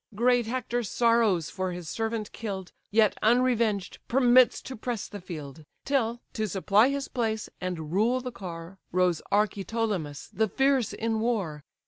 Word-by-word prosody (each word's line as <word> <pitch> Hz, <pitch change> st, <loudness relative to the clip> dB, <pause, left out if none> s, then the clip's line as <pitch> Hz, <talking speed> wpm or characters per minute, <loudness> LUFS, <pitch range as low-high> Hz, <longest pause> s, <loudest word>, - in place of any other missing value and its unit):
Great 240 Hz, +1 st, +3 dB
Hector 245 Hz, 0 st, -1 dB
sorrows 230 Hz, -6 st, +2 dB
for 185 Hz, -1 st, -2 dB
his 175 Hz, -2 st, -7 dB
servant 225 Hz, +2 st, -3 dB
kill'd, 195 Hz, -5 st, -5 dB, 0.2 s
Yet 215 Hz, 0 st, +4 dB
unrevenged 230 Hz, -4 st, +2 dB
permits 250 Hz, 0 st, +5 dB
to 260 Hz, -, -7 dB
press 230 Hz, -1 st, -4 dB
the 205 Hz, -, -8 dB
field; 155 Hz, -4 st, -8 dB, 0.2 s
Till, 240 Hz, -4 st, 0 dB
to 220 Hz, -1 st, -1 dB
supply 205 Hz, +5 st, +3 dB
his 280 Hz, 0 st, -2 dB
place 220 Hz, -3 st, -2 dB
and 170 Hz, -4 st, -4 dB
rule 225 Hz, +7 st, +2 dB
the 250 Hz, 0 st, -5 dB
car, 180 Hz, -2 st, -8 dB
Rose 180 Hz, -2 st, +2 dB
Archeptolemus, 205 Hz, -6 st, -1 dB
the 220 Hz, 0 st, +2 dB
fierce 270 Hz, +1 st, +2 dB
in 225 Hz, 0 st, -1 dB
war. 200 Hz, -11 st, -1 dB
220 Hz, 145 wpm, -27 LUFS, 185-240 Hz, 0.2 s, permits